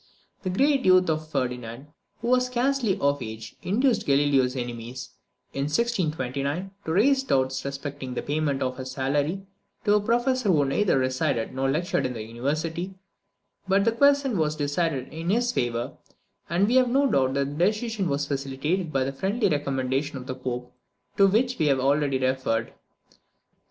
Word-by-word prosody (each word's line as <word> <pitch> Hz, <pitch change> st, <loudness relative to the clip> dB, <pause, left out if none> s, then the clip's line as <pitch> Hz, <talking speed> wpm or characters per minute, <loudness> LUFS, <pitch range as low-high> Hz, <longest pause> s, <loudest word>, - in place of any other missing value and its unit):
The 185 Hz, -, -3 dB
great 270 Hz, +8 st, +2 dB
youth 185 Hz, -2 st, +5 dB
of 155 Hz, 0 st, -3 dB
Ferdinand, 125 Hz, -1 st, -3 dB, 0.3 s
who 235 Hz, -, -2 dB
was 250 Hz, 0 st, +3 dB
scarcely 250 Hz, -4 st, +1 dB
of 140 Hz, 0 st, +1 dB
age, 110 Hz, -1 st, -7 dB
induced 240 Hz, +6 st, +1 dB
Galileo's 140 Hz, -2 st, +3 dB
enemies, 120 Hz, +1 st, -6 dB, 0.4 s
in 140 Hz, -, -1 dB
1629, 155 Hz, -, -1 dB
to 160 Hz, -, -2 dB
raise 265 Hz, +10 st, +4 dB
doubts 135 Hz, -, 0 dB
respecting 140 Hz, -2 st, -5 dB
the -, -, -3 dB
payment 145 Hz, -2 st, -1 dB
of 130 Hz, 0 st, -3 dB
a 130 Hz, -, -5 dB
salary 145 Hz, +8 st, -1 dB, 0.4 s
to 205 Hz, -, +4 dB
a 210 Hz, -, +4 dB
professor 240 Hz, +1 st, +1 dB
who 150 Hz, -6 st, +4 dB
neither 155 Hz, +4 st, +2 dB
resided 130 Hz, -2 st, 0 dB
nor 135 Hz, +1 st, 0 dB
lectured 155 Hz, 0 st, 0 dB
in 125 Hz, -, -5 dB
the 110 Hz, -3 st, -5 dB
university; 155 Hz, -, -3 dB, 0.7 s
but 195 Hz, +1 st, +3 dB
the 230 Hz, -, +4 dB
question 280 Hz, -3 st, +3 dB
was 155 Hz, -1 st, +1 dB
decided 145 Hz, -1 st, -1 dB
in 165 Hz, +2 st, -4 dB
his 240 Hz, +4 st, +2 dB
favour, 120 Hz, -, -2 dB, 0.5 s
and 175 Hz, +4 st, +2 dB
we 245 Hz, +3 st, +3 dB
have 255 Hz, -1 st, +4 dB
no 275 Hz, +3 st, +3 dB
doubt 135 Hz, -, +2 dB
that 140 Hz, +1 st, -1 dB
the 175 Hz, -, +5 dB
decision 215 Hz, -3 st, -1 dB
was 140 Hz, +1 st, 0 dB
facilitated 145 Hz, +5 st, -2 dB
by 135 Hz, -2 st, +1 dB
the 135 Hz, +1 st, -3 dB
friendly 200 Hz, -, 0 dB
recommendation 135 Hz, -1 st, -1 dB
of 125 Hz, -, -8 dB
the 130 Hz, -, -4 dB
Pope, 125 Hz, -1 st, -5 dB, 0.4 s
to 195 Hz, -, +6 dB
which 245 Hz, +5 st, +1 dB
we 155 Hz, -, +3 dB
have 135 Hz, -2 st, +3 dB
already 140 Hz, +1 st, +2 dB
referred. 130 Hz, -4 st, -1 dB
145 Hz, 165 wpm, -26 LUFS, 130-200 Hz, 0.7 s, to